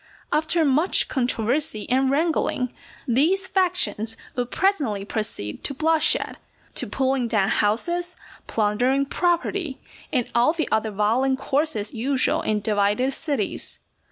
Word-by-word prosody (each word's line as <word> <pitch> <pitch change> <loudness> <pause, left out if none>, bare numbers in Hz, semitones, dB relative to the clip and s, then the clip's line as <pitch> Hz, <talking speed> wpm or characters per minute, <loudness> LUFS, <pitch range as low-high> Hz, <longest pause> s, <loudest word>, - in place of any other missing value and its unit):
After 315 +2 +2
much 300 +7 +3
controversy 245 -2 0
and 260 +2 +2
wrangling, 280 -4 0 0.3
these 330 +11 +2
factions 355 - +1 0.2
would 245 -1 -2
presently 280 - 0
proceed 210 - -4
to 280 - -1
bloodshed, 315 +2 +1 0.4
to - - +1
pulling 265 -2 0
down 205 -4 +1
houses, 345 +12 0 0.3
plundering 245 +6 +1
property, 345 -1 -1 0.3
and 250 -5 0
all 240 +6 +4
the 330 -2 -2
other 220 0 +1
violent 225 +6 +1
courses 275 -6 -1
usual 260 +3 +1
in 215 -1 -1
divided 210 +5 +1
cities. 280 -11 -2
265 Hz, 120 wpm, -23 LUFS, 220-315 Hz, 0.4 s, all